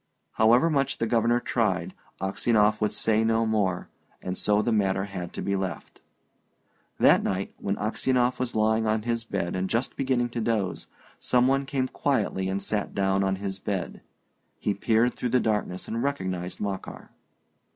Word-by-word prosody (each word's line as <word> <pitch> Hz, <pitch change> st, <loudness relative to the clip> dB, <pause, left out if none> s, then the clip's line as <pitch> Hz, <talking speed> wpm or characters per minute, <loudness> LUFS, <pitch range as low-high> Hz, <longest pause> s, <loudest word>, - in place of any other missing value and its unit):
However 120 Hz, +9 st, +4 dB
much 140 Hz, -2 st, +1 dB
the -, -, 0 dB
Governor 115 Hz, +1 st, +2 dB
tried, 110 Hz, -6 st, -1 dB, 0.3 s
Aksionov 105 Hz, +3 st, +2 dB
would 105 Hz, -, +2 dB
say 110 Hz, 0 st, +1 dB
no 115 Hz, 0 st, +2 dB
more, 100 Hz, -5 st, 0 dB, 0.3 s
and 90 Hz, -, -4 dB
so 105 Hz, +2 st, +1 dB
the 120 Hz, -, 0 dB
matter 95 Hz, -3 st, +1 dB
had 90 Hz, -3 st, -6 dB
to -, -, -5 dB
be 100 Hz, -, 0 dB
left. 95 Hz, -5 st, -5 dB, 1.0 s
That -, -, +6 dB
night, 95 Hz, 0 st, -2 dB
when 100 Hz, 0 st, -1 dB
Aksionov 125 Hz, +4 st, 0 dB
was 125 Hz, -1 st, -2 dB
lying 110 Hz, +1 st, +2 dB
on 110 Hz, 0 st, +1 dB
his 115 Hz, 0 st, -1 dB
bed 100 Hz, -5 st, -3 dB
and 95 Hz, 0 st, -1 dB
just 115 Hz, +3 st, -1 dB
beginning 130 Hz, -3 st, 0 dB
to 120 Hz, 0 st, -3 dB
doze, 110 Hz, -5 st, -1 dB, 0.3 s
some 125 Hz, 0 st, +3 dB
one 135 Hz, +1 st, +1 dB
came 135 Hz, -2 st, 0 dB
quietly 105 Hz, -9 st, -1 dB
and 95 Hz, +1 st, -2 dB
sat 105 Hz, 0 st, -2 dB
down 95 Hz, 0 st, +2 dB
on 95 Hz, 0 st, +1 dB
his 95 Hz, 0 st, -5 dB
bed. 95 Hz, -2 st, -4 dB, 0.6 s
He 105 Hz, -, -1 dB
peered 115 Hz, +4 st, +2 dB
through 125 Hz, -, -3 dB
the 125 Hz, +2 st, +3 dB
darkness 105 Hz, -5 st, -1 dB
and 115 Hz, +1 st, -2 dB
recognised 95 Hz, -10 st, -3 dB
Makar. 100 Hz, -2 st, -5 dB
110 Hz, 170 wpm, -26 LUFS, 95-120 Hz, 1.0 s, That